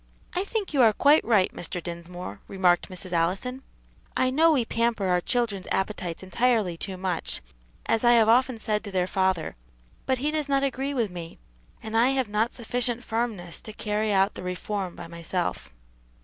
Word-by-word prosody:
"I 365 - 0
think 410 -4 -3
you 275 - +4
are 225 -3 +6
quite 290 +7 +5
right, 210 -5 +3
Mr. 175 +1 -3
Dinsmore," 175 +1 -7
remarked 180 -3 +2
Mrs. 185 0 -9
Allison. 190 +10 0 0.6
"I 255 0 +3
know 320 +5 +5
we 260 -7 +2
pamper 230 -3 0
our 180 -1 +2
children's 220 -4 0
appetites 190 -3 -2
entirely 215 -1 +1
too 190 +2 -5
much, 180 -3 -1 0.5
as 225 0 +1
I 240 0 +6
have 225 -2 +5
often 250 +1 +4
said 215 -1 -1
to 205 - -6
their 185 -1 +1
father; 190 -3 0 0.5
but 260 - +2
he 290 +4 -1
does 305 -2 -2
not 275 0 +2
agree 275 +1 -1
with 225 -6 0
me, 170 -2 -8 0.5
and 220 0 -5
I 230 +2 +5
have 255 -5 0
not 215 +4 0
sufficient 240 0 -2
firmness 220 -8 -3
to 215 - -9
carry 210 0 -1
out 195 +1 +3
the - - -7
reform 180 +1 -3
by 175 - -8
myself." 170 +1 -3
210 Hz, 180 wpm, -26 LUFS, 180-245 Hz, 0.6 s, are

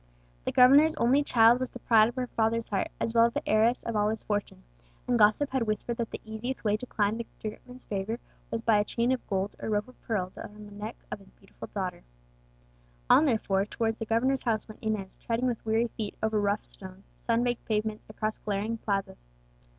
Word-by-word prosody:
The - - 0
governor's 280 +5 +6
only 260 +5 +3
child 235 -3 +5
was 255 - -2
the - - -9
pride 225 -2 +5
of 240 - -9
her 255 -1 -1
father's 230 -1 0
heart, 200 - 0
as 225 - -1
well 230 0 +6
as 235 - -6
the - - -3
heiress 225 +3 +3
of 230 - -3
all 210 0 +2
his 220 0 -3
fortune; 205 - -3 0.4
and 245 -1 +2
gossip 215 +7 +4
had 255 -4 0
whispered 215 +2 -1
that 230 -1 -2
the - - -6
easiest 220 +4 -4
way 210 -2 +2
to 250 - -8
climb 215 0 0
to - - -2
the 220 - -7
great 210 - -13
man's 250 +1 -11
favour 205 +3 -3 0.3
was 225 0 -3
by 220 -3 +4
a - - +3
chain 235 +3 0
of 260 - -2
gold 195 0 -1
or - - -4
rope 210 +1 0
of 255 - -18
pearl 185 -5 -2
round 210 0 -9
the 205 - -13
neck 210 +3 -6 0.2
of - - -4
his 195 - -18
beautiful 195 - -12
daughter. 185 - -4 1.1
On, 315 - +7
therefore, 200 -6 +1
towards 225 0 -1
the 225 - -3
governor's 255 +4 +2
house 225 -3 -1
went 215 - -12
Inez, 215 -3 -3
treading 235 +2 -1
with 245 -3 -1
weary 225 +2 +2
feet 210 -2 -4
over 220 -1 +2
rough 205 +1 0
stones, 190 0 -11
sun 230 0 +1
baked 245 -1 -1
pavements, 215 0 -2
across 215 0 -3
glaring 215 +2 -2
plazas. 195 - -2
220 Hz, 220 wpm, -29 LUFS, 210-235 Hz, 1.1 s, On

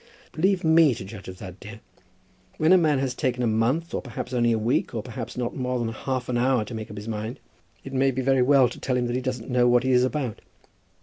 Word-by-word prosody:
"Leave 185 +4 +1
me 160 -4 +5
to 95 - -7
judge 100 0 -10
of 95 0 -8
that, 95 0 -10
dear. 105 +2 -10 0.8
When 160 +4 +4
a - - +8
man 155 -4 +2
has 130 -1 -1
taken 125 -1 -1
a - - +2
month, 120 +9 0
or - - -1
perhaps 125 0 -7
only 120 -1 +2
a 115 - +2
week, 115 +2 0
or 110 - -3
perhaps 120 0 -7
not 120 -1 -2
more 125 -1 -2
than 120 -2 -1
half 125 +2 -3
an 120 -1 0
hour, 125 -3 +2
to 120 - -8
make 110 -1 -6
up 105 - -9
his 105 +2 -7
mind, 110 +2 -4 0.4
it 135 - -8
may 135 +1 +3
be 130 0 -2
very 135 0 +3
well 135 0 +5
to 120 - -9
tell 130 -2 -1
him 125 - 0
that 120 0 -2
he 130 - -1
doesn't 125 -1 -4
know 125 0 +3
what 120 0 +4
he 130 - +1
is 125 0 +4
about. 130 -3 -2
125 Hz, 260 wpm, -25 LUFS, 115-135 Hz, 0.8 s, a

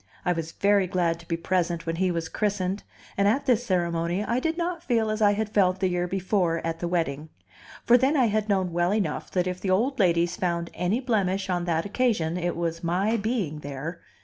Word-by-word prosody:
I 180 - +3
was 165 -1 -5
very 200 -1 +3
glad 170 -3 0
to 170 - -15
be 165 - -1
present 170 -1 -1
when 165 0 -2
he 185 +1 +2
was 165 -2 -2
christened, 200 -2 -1 0.3
and 200 0 +2
at 245 +7 +2
this 245 -3 +3
ceremony 175 -2 0
I 235 +3 0
did 325 +4 -1
not 345 -1 -2
feel 230 -8 +1
as 215 +1 -3
I 205 -1 +5
had 215 +1 -1
felt 190 -3 +2
the 190 -1 +1
year 180 0 -1
before 185 -2 0
at 165 0 -2
the 175 - -2
wedding; 160 -3 -2 0.6
for 245 +1 +6
then 275 +4 +2
I 255 - +4
had 215 -1 0
known 190 -3 +1
well 175 +3 +2
enough 210 -3 -2
that 180 -1 0
if 180 0 -4
the 195 - -2
old 235 +9 +1
ladies 175 -2 +2
found 170 -2 -1
any 180 +7 0
blemish 200 -6 0
on 175 -1 -1
that 165 0 0
occasion, 205 -7 0
it 175 -1 -1
was 165 0 -3
my 190 +6 +1
being 205 -9 -2
there! 150 +4 -6
185 Hz, 220 wpm, -26 LUFS, 170-215 Hz, 0.6 s, for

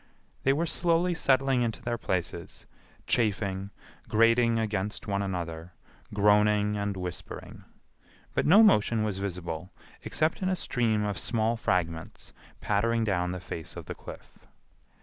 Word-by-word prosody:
They 135 - +3
were 155 +5 +1
slowly 170 +1 +1
settling 135 -4 +2
into 115 -2 -2
their 120 -1 -2
places, 90 -5 -3 0.4
chafing, 100 -3 0 0.4
grating 115 +1 +4
against 105 -2 -2
one 100 -2 -1
another, 85 -3 -4 0.4
groaning, 105 0 +3
and 100 -1 -2
whispering; 90 -2 -7 0.7
but - - +1
no 200 +8 +8
motion 110 - +4
was 105 -3 -2
visible 90 -3 -4 0.3
except 155 +4 0
in 185 - +1
a 185 - +1
stream 115 -9 0
of 100 -2 -2
small 115 -1 +1
fragments 85 -7 -2 0.3
pattering 115 +3 +1
down 90 -4 0
the 90 - -4
face 85 -2 -6
of - - -7
the - - -5
cliff. - - -12
105 Hz, 135 wpm, -28 LUFS, 95-120 Hz, 0.7 s, no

